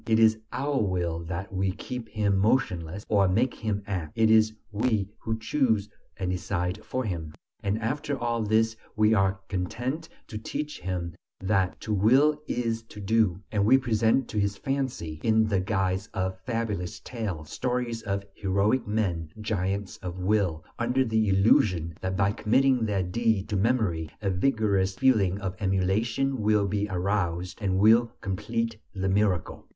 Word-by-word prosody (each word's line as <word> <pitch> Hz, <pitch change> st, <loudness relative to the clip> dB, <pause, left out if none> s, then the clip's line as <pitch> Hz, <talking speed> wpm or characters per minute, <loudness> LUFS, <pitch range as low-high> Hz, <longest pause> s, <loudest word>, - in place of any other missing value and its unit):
It 110 Hz, -1 st, +4 dB
is 110 Hz, -1 st, +6 dB, 0.2 s
by -, -, -4 dB
our 145 Hz, -3 st, +1 dB
will 90 Hz, -5 st, -1 dB
that 95 Hz, +5 st, -5 dB
we 95 Hz, 0 st, 0 dB
keep 120 Hz, +2 st, -6 dB
him 100 Hz, -3 st, +1 dB
motionless, 95 Hz, -5 st, 0 dB
or 100 Hz, -3 st, +3 dB
make 115 Hz, +8 st, +2 dB
him 105 Hz, -2 st, -3 dB
act; 90 Hz, -6 st, -4 dB
it 110 Hz, 0 st, +4 dB
is 110 Hz, 0 st, +5 dB, 0.2 s
we 105 Hz, -2 st, 0 dB
who 110 Hz, 0 st, -2 dB
choose 110 Hz, -4 st, +1 dB, 0.3 s
and 90 Hz, -1 st, -2 dB
decide 90 Hz, +1 st, -2 dB
for 130 Hz, -, -2 dB
him. 80 Hz, -7 st, -4 dB, 0.3 s
And 100 Hz, +1 st, 0 dB
after 135 Hz, +5 st, -2 dB
all 115 Hz, -1 st, -1 dB
this 110 Hz, +1 st, +2 dB, 0.2 s
we 110 Hz, 0 st, +4 dB
are 95 Hz, -2 st, +2 dB
content 120 Hz, -, -3 dB, 0.2 s
to 105 Hz, -, -5 dB
teach 150 Hz, +7 st, -4 dB
him 90 Hz, -2 st, -3 dB, 0.3 s
that 95 Hz, -2 st, 0 dB
"to 110 Hz, -, -2 dB
will 135 Hz, +9 st, +4 dB
is 115 Hz, -2 st, -1 dB
to 105 Hz, -, -10 dB
do" 105 Hz, +2 st, -4 dB
(volere 90 Hz, -, -5 dB
è -, -, -12 dB
potere). 95 Hz, -, -16 dB
And 100 Hz, -2 st, +2 dB
we 130 Hz, +3 st, +7 dB
present 115 Hz, 0 st, +2 dB
to 105 Hz, -, -1 dB
his 100 Hz, -1 st, 0 dB
fancy, 130 Hz, -, -3 dB
in 110 Hz, -1 st, +4 dB
the 100 Hz, -3 st, +1 dB
guise 95 Hz, 0 st, -1 dB
of 95 Hz, 0 st, -2 dB
fabulous 110 Hz, -7 st, -2 dB
tales, 95 Hz, -11 st, -5 dB
stories 125 Hz, -2 st, -2 dB
of 100 Hz, 0 st, -2 dB
heroic 100 Hz, +6 st, +1 dB
men, 95 Hz, -7 st, -1 dB
giants 100 Hz, -2 st, -2 dB
of 90 Hz, -1 st, -6 dB
will, 90 Hz, -4 st, 0 dB
under 125 Hz, +2 st, +2 dB
the 110 Hz, -2 st, +1 dB
illusion 95 Hz, -4 st, +3 dB
that 95 Hz, 0 st, -2 dB
by 100 Hz, 0 st, +3 dB
committing 125 Hz, +2 st, +2 dB
their 100 Hz, -3 st, 0 dB
deeds 110 Hz, +2 st, 0 dB
to 105 Hz, -, -1 dB
memory 100 Hz, -7 st, +1 dB
a 100 Hz, -3 st, -1 dB
vigorous 100 Hz, -2 st, +1 dB
feeling 100 Hz, -8 st, +3 dB
of 95 Hz, -2 st, -4 dB
emulation 110 Hz, +7 st, 0 dB
will 105 Hz, -1 st, +3 dB
be 105 Hz, +1 st, -1 dB
aroused 90 Hz, -1 st, -1 dB
and 95 Hz, -2 st, +1 dB
will 115 Hz, +3 st, +5 dB
complete 115 Hz, +3 st, -2 dB, 0.2 s
the 95 Hz, 0 st, -1 dB
miracle. 95 Hz, -3 st, 0 dB
105 Hz, 170 wpm, -27 LUFS, 95-115 Hz, 0.3 s, we